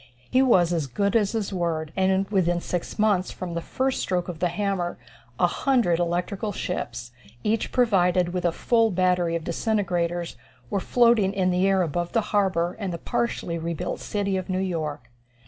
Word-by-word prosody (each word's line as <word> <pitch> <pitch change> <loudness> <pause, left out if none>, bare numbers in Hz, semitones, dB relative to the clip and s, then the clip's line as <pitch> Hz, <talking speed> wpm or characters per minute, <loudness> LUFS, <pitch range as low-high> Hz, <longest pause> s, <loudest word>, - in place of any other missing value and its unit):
He 255 - +4
was 180 -10 +4
as 160 -4 -1
good 200 - 0
as 210 -2 +2
his 215 -3 -2
word, 165 -3 -2
and 190 +1 +2
within 175 -3 +2
six 175 0 -4
months 205 -4 +2
from 180 -2 -6
the 170 - -2
first 260 +8 -1
stroke 180 -2 -1
of 175 -3 -6
the 180 - +2
hammer, 180 -1 -2 0.4
a - - +5
hundred 240 -11 +2
electrical 180 +5 -1
ships, 120 -10 -4 0.3
each 220 +1 0
provided 180 -7 +3
with 180 0 -3
a 175 - +2
full 230 +5 +2
battery 180 -3 +1
of 165 - -3
disintegrators, 175 - -1 0.3
were 200 - +1
floating 230 -3 +3
in 185 -2 +1
the 180 +2 +2
air 190 -1 +3
above 175 +2 -2
the 230 - +3
harbor 185 -4 +1
and 195 -4 -3
the 170 - -3
partially 170 -3 -2
rebuilt 165 -1 -3
city 200 -2 -1
of 185 - -5
New 185 - 0
York. 155 -9 -3
180 Hz, 180 wpm, -25 LUFS, 170-200 Hz, 0.4 s, a